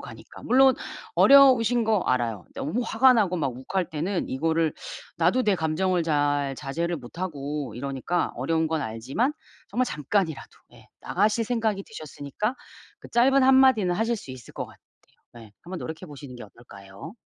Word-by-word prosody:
가니까. - - -12
물론 265 +1 +5 0.4
어려우신 250 -4 +6
거 215 -2 +2
알아요. 120 - -1
너무 210 - -2
화가 255 +4 +5
나고 200 -6 +1
막 140 -6 -1
욱할 175 +8 -3
때는 170 +5 -3
이거를 160 +3 0 0.4
나도 175 +10 +2
내 205 -2 +3
감정을 175 +2 0
잘 145 -3 0
자제를 170 +5 -3
못하고 145 - -5
이러니까 140 +6 -2
어려운 160 0 0
건 160 0 -1
알지만 130 - -2 0.4
정말 250 +5 0
잠깐이라도 160 - -2 0.2
예 - - -18
나가실 210 +4 +1
생각이 220 -4 -1
드셨으니까 155 - -5 0.4
그 - - -13
짧은 265 +3 +4
한마디는 260 -8 +5
하실 225 +5 0
수 170 - -10
있을 130 -2 -12
것 - - -4
같아요. - - -17 0.6
네. 115 -3 -13
한번 180 +1 -7
노력해 160 +3 -7
보시는 140 -3 -10
게 120 - -9
어떨까요? 100 - -12
165 Hz, 350 characters per minute, -25 LUFS, 140-220 Hz, 0.6 s, 어려우신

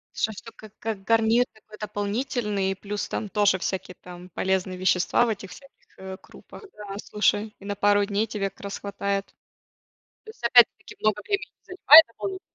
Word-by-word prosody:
Что 220 - 0
всё. 230 +3 -11
Как 215 -2 -14
как 215 -3 -4
гарнир 225 +2 +3
такой 215 0 -16
дополнительный, 210 -1 -2
плюс 205 +2 -5
там 215 - -3
тоже 205 -2 +2
всякие 185 -1 -4
там 180 0 -11
полезные 185 +1 -1
вещества 185 +5 +2
в 235 - -1
этих 195 -3 -5
всяких, 275 0 -16
э, 190 0 -8
крупах, - - -15
да, 205 -1 -8
слушай. 210 +1 0
И 200 - -14
на 205 - -3
пару 205 0 +3
дней 205 +1 0
тебе 200 -3 -3
как 195 - -20
раз 200 0 -6
хватает. 200 0 -3 1.0
То 440 - -12
есть 445 - -26
опять-таки 235 0 +4
много 215 -1 0
времени 405 -1 -3
занимает. 345 +1 +5
205 Hz, 165 wpm, -25 LUFS, 195-225 Hz, 1.0 s, занимает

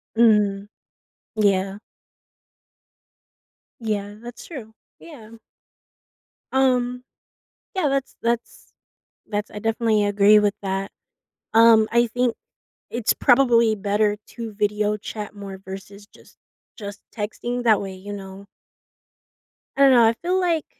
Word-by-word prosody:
Mhm. 210 -3 +3 0.7
Yeah. 195 -2 +1 2.1
Yeah, 205 -2 -2
that's 240 0 -10
true, 225 -9 -10 0.2
yeah. 240 -10 -13 1.2
Um, 250 -2 +1 0.7
yeah, 365 -6 +1
that's 275 -1 -2
that's 235 0 -3 0.6
that's 210 0 -3
I 210 - -7
definitely 225 -1 +1
agree 205 +1 +5
with 205 -1 +1
that. 195 0 -3 0.6
Um, 225 -1 +6
I 235 +1 +4
think 245 0 0 0.6
it's 235 -2 0
probably 240 -4 +4
better 205 +1 0
to 230 -2 -7
video 210 0 0
chat 210 0 -7
more 195 -1 -8
versus 195 +2 -10
just - - -21 0.4
just 205 -3 -8
texting, 240 +3 -4
that 220 -3 +4
way, 195 -1 -6
you 200 +2 -8
know 195 0 -9 1.3
I - - +1
don't 275 -1 +7
know, 240 -2 +6
I 225 - +4
feel 365 +2 +1
like, 335 -4 0
215 Hz, 115 wpm, -23 LUFS, 205-240 Hz, 2.1 s, don't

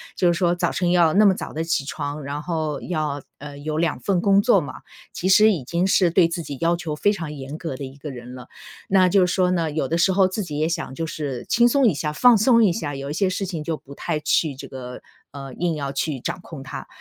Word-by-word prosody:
就 175 -1 +3
是 170 - -1
说 175 -1 +2
早 175 -1 0
晨 175 -2 0
要 170 -3 +4
那 210 +4 +5
么 195 - +6
早 - - -7
起 165 -4 0
床， 145 +1 -5
然 140 +2 -4
后 155 -3 -3
要， 155 -4 -3 0.2
呃， 145 0 -9
有 155 +1 -3
2 165 -1 0
份 190 -3 0
工 200 0 +4
作 205 -4 +4
嘛， 140 -4 -7 0.4
其 180 - -3
实 210 +3 +6
已 175 -8 -2
经 170 +6 0
是 185 -2 +3
对 170 +1 +4
自 170 +1 -4
己 145 -4 -7
要 170 +1 +2
求 160 -3 -4
非 205 +7 +2
常 165 -7 -5
严 140 +1 -7
格 165 -5 -5
的 140 - -7
一 135 +1 -9
个 150 +1 -7
人 125 -1 -9
了。 125 -1 -10 0.4
那 185 -1 +4
就 185 0 +4
是 - - -1
说 180 -1 +2
呢， 170 -3 0
有 150 -3 -1
的 165 - 0
时 190 +3 +3
候 190 0 +4
自 190 +3 -4
己 150 -4 -6
也 155 +2 0
想 150 -5 -4
就 165 - -3
是 140 -6 -5
轻 240 0 +4
松 275 +2 +3
一 190 - +3
下、 150 +1 -3
放 245 +6 +6
松 230 +2 +4
一 200 - +4
下， 145 -4 -4
有 135 +1 -6
一 - - -3
些 190 +4 +1
事 185 +1 -2
情 175 -4 -5
就 160 +1 -2
不 140 -1 -14
太 150 - -3
去 150 -1 +1
这 - - -9
个， 125 -2 -8 0.3
呃， 135 -2 -8
硬 170 -2 -1
要 140 -2 -4
去 140 0 -2
掌 - - -4
控 155 -6 -10
它。 130 - -8
165 Hz, 280 characters per minute, -22 LUFS, 145-185 Hz, 0.4 s, 么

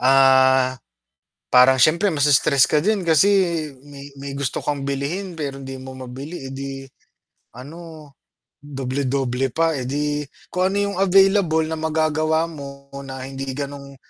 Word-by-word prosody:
ah, 130 0 +4 0.8
parang 130 +1 +6
siyempre 170 - +3
mas-stress 140 -2 +4
ka 150 -1 +1
din 200 -3 0
kasi 160 +4 +5 0.6
may 140 0 -11
may 140 0 -7
gusto 140 -2 -2
kang 145 -2 -2
bilhin 140 +8 -3
pero 140 -2 -4
hindi 135 0 -7
mo 130 0 -9
mabili. 135 +4 -8
Eh, - - -8
di 135 0 -6 0.7
ano, 155 +3 -11 0.5
doble-doble 135 -2 -2
pa 165 +5 +1
eh, 130 -2 -4
di 145 +1 -1 0.3
kung 185 +1 +1
ano 200 - -3 0.2
yung - - -7
available 195 -4 +4
na 160 0 -4
magagawa 160 0 +1
mo 140 -3 -11
na, 135 -1 -7
hindi 135 0 -6
ganong 140 -1 -7
140 Hz, 140 wpm, -21 LUFS, 135-160 Hz, 0.8 s, parang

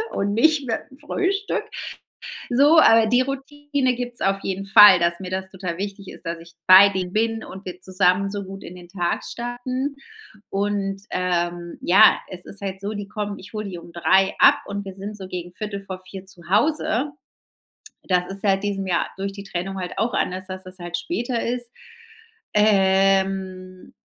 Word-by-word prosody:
und 200 +1 -1
nicht 295 +4 +3
mit 225 -2 0
'nem 265 - -16
Frühstück. 395 +7 -1 0.9
So, 285 +6 +6
aber 225 -6 +6
die 245 +3 +4
Routine 275 0 -2
gibt's 245 0 -5
auf 195 0 +1
jeden 195 0 -3
Fall, 200 -2 +9
dass 170 0 +1
mir 185 -2 -6
das 190 0 -3
total 180 -3 -5
wichtig 200 0 -6
ist, - - -11
dass 165 0 -4
ich 170 0 -15
bei 190 +2 +9
denen 185 -2 -3
bin 225 +2 0
und 190 +1 -10
wir 180 0 -8
zusammen 185 +1 +1
so 205 -1 -4
gut 195 +1 -9
in - - -9
den 175 -1 -12
Tag 175 -2 -2
starten. 255 +3 -4 0.5
Und, 195 -1 -1
ähm, 175 -1 -2
ja, 195 +5 +6
es 180 -1 -7
ist 200 - -10
halt 190 -1 -4
so, 205 +2 -4
die 205 -1 -6
kommen 205 -1 -4
ich 190 - -12
hole 215 -1 -4
die 185 -3 -6
um 170 - -13
3:00 190 +3 +3
ab - - +7
und 200 0 -5
wir 195 - -7
sind 205 +2 -7
so 190 -2 -8
gegen 175 -1 -6
15:45 195 -1 -7
zu 175 -3 -12
Hause. 275 +3 +1 0.9
Das 180 -1 +1
ist 195 +1 -3
seit 195 -1 +1
diesem 200 -1 -2
Jahr 175 - +1
durch 195 +1 -3
die 200 0 -9
Trennung 195 +1 -4
halt 180 -1 -5
auch 235 +2 0
anders, 185 +1 -2
dass 185 0 -7
das 185 0 -11
halt 175 0 -4
später 240 - -2
ist. 240 0 -3 0.8
Ähm 190 -2 +1
195 Hz, 180 wpm, -23 LUFS, 185-220 Hz, 0.9 s, Fall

